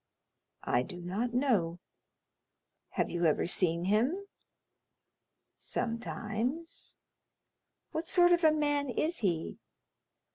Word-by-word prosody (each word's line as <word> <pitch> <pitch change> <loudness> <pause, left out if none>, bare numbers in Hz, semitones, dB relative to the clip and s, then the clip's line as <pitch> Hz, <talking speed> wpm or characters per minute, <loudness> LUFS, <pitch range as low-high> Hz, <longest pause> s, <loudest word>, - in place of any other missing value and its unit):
"I 120 - +2
do 175 +8 -7
not 195 +8 -2
know." 225 -10 +1 1.2
"Have - - +1
you 175 0 0
ever 155 - +3
seen 170 -1 +1
him?" 250 - +1 1.3
"Sometimes." 235 +6 -3 0.9
"What 320 +1 -3
sort 355 -1 +5
of 350 0 +4
a 315 - +7
man 290 -2 +1
is 315 +8 -1
he?" 170 -6 -1
235 Hz, 100 wpm, -31 LUFS, -, 1.3 s, a